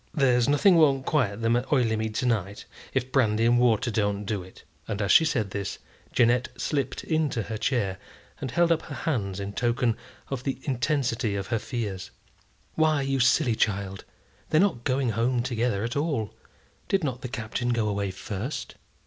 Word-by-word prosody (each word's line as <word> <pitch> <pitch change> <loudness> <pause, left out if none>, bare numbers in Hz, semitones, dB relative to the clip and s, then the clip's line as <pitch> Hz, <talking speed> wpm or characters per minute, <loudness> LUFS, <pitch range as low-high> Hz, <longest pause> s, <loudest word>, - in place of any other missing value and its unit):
There's 125 -4 +3
nothing 170 +5 +5
won't 135 -4 +4
quiet 115 -8 0
them 115 +1 +3
at 125 +2 -2
Oileymead 110 -5 +1
to 125 - 0
night, 105 -4 -1 0.3
if 130 -1 -1
brandy 115 -4 +2
and 120 +1 +4
water 120 0 +3
don't 105 -1 0
do 100 -1 -2
it." 95 +1 -14 0.2
As 100 -2 -1
she 160 - +7
said 115 -10 0
this, 100 -2 -4 0.3
Jeannette 120 +1 +3
slipt 140 +2 -2
into 155 -8 0
her 110 +1 -5
chair, 105 -6 0 0.4
and 130 - -4
held 170 +6 +2
up 165 -1 +2
her - - -8
hands 100 - -2
in 100 0 -5
token 120 0 +1 0.4
of 130 -2 -3
the 135 -1 -2
intensity 125 -4 0
of 100 -1 -4
her 115 -2 +1
fears. 105 -6 -4 0.6
"Why, 155 -3 +2
you 135 0 0
silly 130 0 +3
child, 100 -3 -1 0.5
they're 155 - +4
not 180 -11 +1
going 130 -1 +1
home 120 +3 +1
together 120 -4 -1
at 120 +1 -3
all. 145 -8 -1 0.5
Did 195 -2 +1
not 130 -4 -2
the - - -4
Captain 120 0 -3
go 115 -3 +1
away 100 -1 -1
first?" 100 +7 -5
120 Hz, 175 wpm, -26 LUFS, 105-135 Hz, 0.6 s, she